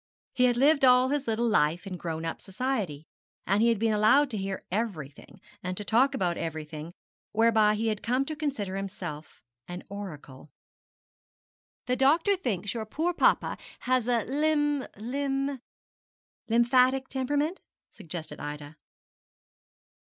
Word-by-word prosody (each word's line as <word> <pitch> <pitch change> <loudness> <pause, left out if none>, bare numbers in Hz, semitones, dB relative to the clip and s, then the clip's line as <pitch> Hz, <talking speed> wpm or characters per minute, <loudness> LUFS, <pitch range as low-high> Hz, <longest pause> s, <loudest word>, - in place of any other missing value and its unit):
He 250 - +3
had 245 -1 +2
lived 280 +2 +4
all 255 0 +6
his 285 -2 -1
little 230 +1 +1
life 170 -4 +2
in 190 -2 -5
grown 165 -2 -4
up 165 - -4
society, 195 - -3 0.4
and 200 +3 +2
had 230 0 +4
been 220 +1 +1
allowed 255 +7 +4
to 215 - -2
hear 195 -1 -4
everything, 185 -7 -4 0.2
and 180 0 -4
to 210 - -4
talk 260 +6 +3
about 175 -6 -1
everything, 155 0 -5 0.4
whereby 220 -1 +4
he 225 +1 0
had 215 -1 -2
come 255 +4 0
to 310 - -5
consider 270 -11 -3
himself 175 -6 -7 0.2
an 180 +1 -7
oracle. 155 -9 -9 1.4
'The 250 0 0
doctor 320 +10 +4
thinks 205 - -2
your 220 -2 -4
poor 330 +9 -1
papa - - +2 0.2
has 255 -2 +1
a 240 -3 +2
lym 295 0 +1
lym 270 +3 -2 0.4
' - - -70
'Lymphatic 255 +3 +3
temperament?' 290 +6 -1 0.3
suggested 170 -4 -7
Ida. 145 +1 -7
225 Hz, 140 wpm, -28 LUFS, 185-265 Hz, 1.4 s, all